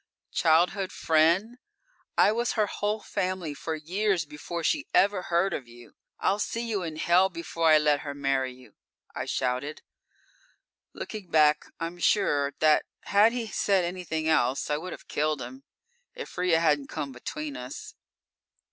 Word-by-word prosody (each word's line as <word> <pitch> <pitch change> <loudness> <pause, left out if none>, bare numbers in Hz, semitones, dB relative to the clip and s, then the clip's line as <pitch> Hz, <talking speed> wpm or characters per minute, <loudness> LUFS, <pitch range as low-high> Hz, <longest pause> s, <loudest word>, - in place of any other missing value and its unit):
"Childhood 180 +4 +2
friend! 170 +10 +2 0.6
I - - +6
was 235 +2 0
her 215 -2 +2
whole 210 +1 -2
family 185 -5 -3
for 160 +3 -4
years 180 +3 0
before 155 +3 -6
she 295 - 0
ever 200 -1 +4
heard 175 +2 +1
of 130 - -5
you! 120 0 -15 0.3
I'll 200 +2 +1
see 230 +3 -2
you 210 -4 -1
in 165 -3 -5
hell 175 +4 +3
before 165 -2 -1
I 155 - +8
let 150 -1 +3
her 140 -1 -6
marry 135 -2 0
you!" 125 0 -16 0.4
I - - -4
shouted. 125 +5 -2 1.1
Looking 210 -5 -7
back, 150 -1 +4
I'm 170 +1 -5
sure 145 -8 +2
that 155 -1 +4 0.2
had 210 +3 +4
he 240 -1 -3
said 195 -4 +1
anything 170 -3 -3
else, 135 -2 +1
I 150 - +2
would 180 +4 -6
have - - -10
killed 150 0 0
him, 265 - -9 0.5
if 485 - -8
Ria 180 -2 +2
hadn't 150 -4 +2
come 140 - -4
between 140 +3 -6
us. 125 0 -8
165 Hz, 155 wpm, -27 LUFS, 150-195 Hz, 1.1 s, I